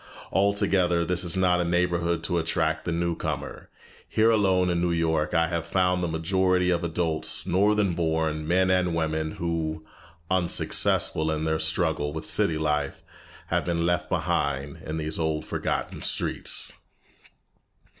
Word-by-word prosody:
Altogether, 95 -3 +2
this 90 +1 +1
is 85 +1 0
not 90 -1 +3
a - - +1
neighborhood 85 -1 0
to 85 +1 0
attract 80 -1 -1
the 85 - -1
new 85 0 -1
comer. - - -5 0.4
Here 110 +1 +3
alone 95 -4 +2
in 85 -1 0
New 90 - +1
York 80 -1 0
I 80 0 +4
have 85 -1 -3
found 90 0 +1
the - - 0
majority 90 +2 +1
of 85 -1 +1
the 85 - -1
adults 80 -1 -1
northern 100 +1 +2
born, 80 -2 -1
men 95 +2 +3
and 90 -2 +1
women 80 -1 -1
who, 80 -2 -3 0.5
unsuccessful 85 -3 +2
in 80 0 -1
their 80 0 0
struggle 80 -2 0
with 80 - -5
city 80 - +1
life, 75 -1 -1 0.5
have - - +1
been 85 -1 -1
left 90 0 0
behind 70 0 -1
in 80 +1 -4
these 80 0 -3
old 80 -1 -1
forgotten - - -3
streets. - - -2
85 Hz, 155 wpm, -26 LUFS, 80-90 Hz, 0.5 s, I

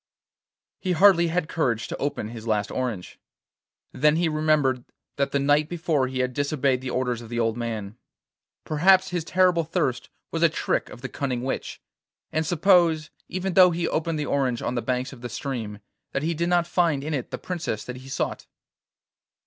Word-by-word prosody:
He 185 -2 -1
hardly 180 -1 +6
had 165 -1 -1
courage 120 -10 -1
to - - -5
open 140 -6 -3
his 115 0 -8
last 105 -2 0
orange. 120 -8 -4 0.7
Then 150 +3 +3
he 170 +1 +2
remembered 155 -5 +1 0.3
that 140 0 0
the - - +1
night 145 +2 +2
before 160 -6 0
he 130 0 -2
had 125 0 -1
disobeyed 140 -2 0
the 130 - -4
orders 125 -2 -1
of 115 - -11
the 120 0 -2
old 115 -1 +1
man. 110 -3 -4 0.7
Perhaps 185 +5 +4
his 175 -2 -1
terrible 180 0 +3
thirst 155 -6 -1 0.2
was 165 - -2
a 170 - +6
trick 160 - -1
of 120 - -11
the 135 - -4
cunning 125 -3 -3
witch, 130 - -4 0.5
and 160 0 -1
suppose, 170 -2 +3 0.2
even 185 0 -2
though 185 0 +8
he 170 0 -1
opened 160 0 -1
the 150 - -2
orange 130 -5 0
on 120 - -1
the 120 - -1
banks 125 +2 -2
of 125 - -13
the 120 - -5
stream, 120 -4 -4 0.4
that 140 - -1
he 165 +2 0
did 170 +2 -1
not 175 -1 +3
find 170 -5 +1
in 155 +1 -3
it 130 -5 -3
the - - -4
princess 170 - -4
that 125 0 -7
he 130 +1 -11
sought? - - -3
145 Hz, 190 wpm, -25 LUFS, 125-170 Hz, 0.7 s, though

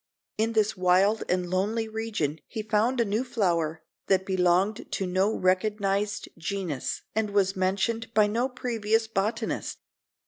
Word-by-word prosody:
In 225 +1 +1
this 215 -1 +2
wild 185 +4 +3
and 180 0 +1
lonely 205 +5 0
region 215 -9 -2
he 220 - -5
found 220 +4 +1
a 235 - +3
new 215 +4 0
flower, 170 -10 0 0.2
that 190 -1 +3
belonged 185 +2 +1
to 195 - -1
no 190 +3 +2
recognized 200 +2 0
genus, 165 -5 -3
and 220 -1 0
was 195 -1 +2
mentioned 195 +5 0
by 215 -1 +6
no 235 +5 0
previous 225 -3 0
botanist. 220 +2 -2
205 Hz, 140 wpm, -27 LUFS, 185-220 Hz, 0.2 s, by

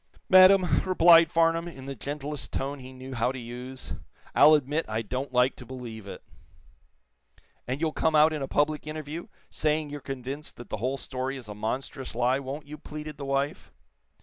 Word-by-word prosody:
"Madame," 185 -1 +7
replied 170 -2 +6
Farnum, 165 0 +2
in 135 -6 -9
the 140 - -4
gentlest 145 +3 -5
tone 140 +1 -3
he 130 0 -10
knew 130 0 -9
how 125 0 +1
to 130 - -7
use, 125 +2 -7 0.4
"I'll 155 +2 +8
admit 150 +3 0
I 110 +1 -2
don't 130 +6 -4
like 125 +1 +3
to - - -9
believe 115 -5 -8
it." - - -9 1.4
"And 130 +3 -2
you'll 160 -1 0
come 160 +1 +1
out 155 +1 +6
in 150 - -3
a 135 - -2
public 150 +2 0
interview, 155 +2 -6 0.2
saying 150 -1 0
you're 145 -1 -6
convinced 135 +3 -6
that 120 - -11
the - - -3
whole 130 +6 -1
story 130 0 -3
is 125 -4 -10
a 105 - -6
monstrous 125 +4 -4
lie, 125 +3 +2
won't 140 +3 -6
you?" 150 +1 -9
pleaded 150 -1 -8
the 140 - -6
wife. 140 +4 -2
140 Hz, 185 wpm, -27 LUFS, 130-155 Hz, 1.4 s, I'll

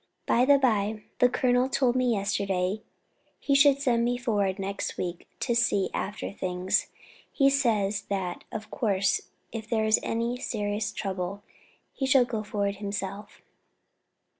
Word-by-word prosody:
By 245 +2 +3
the 285 +1 +6
bye, 215 -5 +1 0.2
the 250 - +6
colonel 250 0 +2
told 255 -2 +2
me 255 -1 +2
yesterday 200 -1 -1 0.6
he 280 - 0
should 280 0 +6
send 245 -4 +2
me 245 +1 +1
forward 205 -6 0
next 195 0 -4
week 175 -1 -4
to 240 - +1
see 205 -5 +2
after 205 +2 -3
things. 185 -1 -1 0.4
He 275 -1 +4
says 215 -7 +1
that 190 -3 -3
of 220 0 -6
course 200 -4 0 0.2
if 220 -1 -6
there 220 -2 +1
is 220 0 +4
any 235 +2 -1
serious 210 -2 -2
trouble 195 0 -4 0.5
he 270 - -2
shall 265 -2 +5
go 225 -3 -3
forward 200 -1 -2
himself." 200 0 -5
215 Hz, 145 wpm, -27 LUFS, 200-245 Hz, 0.6 s, the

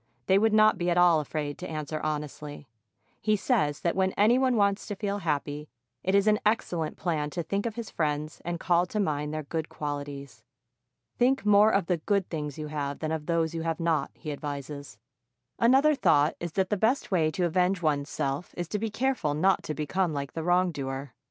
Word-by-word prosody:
they 190 +1 +4
would 220 +1 +3
not 215 0 +5
be 175 0 0
at 175 - +1
all 175 -2 +6
afraid 150 -1 -4
to 180 - -6
answer 155 0 -4
honestly. 150 -1 -5 0.5
He 215 -1 +2
says 195 - 0
that 170 - 0
when 190 0 +1
any 225 +5 +4
one 260 -2 +2
wants 200 -1 +1
to 205 - -4
feel 200 0 -2
happy, 150 -3 -2 0.3
it 190 +6 +1
is 200 0 +4
an 215 0 +4
excellent 175 -7 0
plan 155 -5 -1
to 170 +3 -4
think 200 +6 -2
of 225 - -5
his 235 -3 -6
friends 150 -1 -2
and 175 0 -3
call 175 0 +2
to 210 - -3
mind 150 -6 -1
their 155 0 -3
good 160 +2 -4
qualities. 145 -5 -6 0.8
Think 255 -1 +2
more 210 +1 +6
of 195 -4 +2
the 180 0 +1
good 195 +4 0
things 150 -4 -4
you 155 - -4
have 145 -2 -3
than 155 0 -3
of 160 -2 -3
those 165 -1 +1
you 165 - -3
have 165 -1 -2
not, 165 -2 +1
he 155 - -6
advises. 140 -4 -6 0.6
Another 270 +6 +5
thought 150 - +3
is 170 -2 -5
that 190 +1 0
the 210 - +2
best 225 +6 +1
way 165 -4 +3
to 175 +3 -1
avenge 180 +2 +1
one's 145 -2 0
self 140 +5 -3
is 175 -1 -3
to 210 - -2
be 225 +1 -2
careful 225 - 0
not 190 +5 +3
to 155 - -5
become 170 +3 -1
like 140 -1 -4
the 165 - -3
wrongdoer. 145 -7 -1
170 Hz, 210 wpm, -28 LUFS, 150-200 Hz, 0.8 s, all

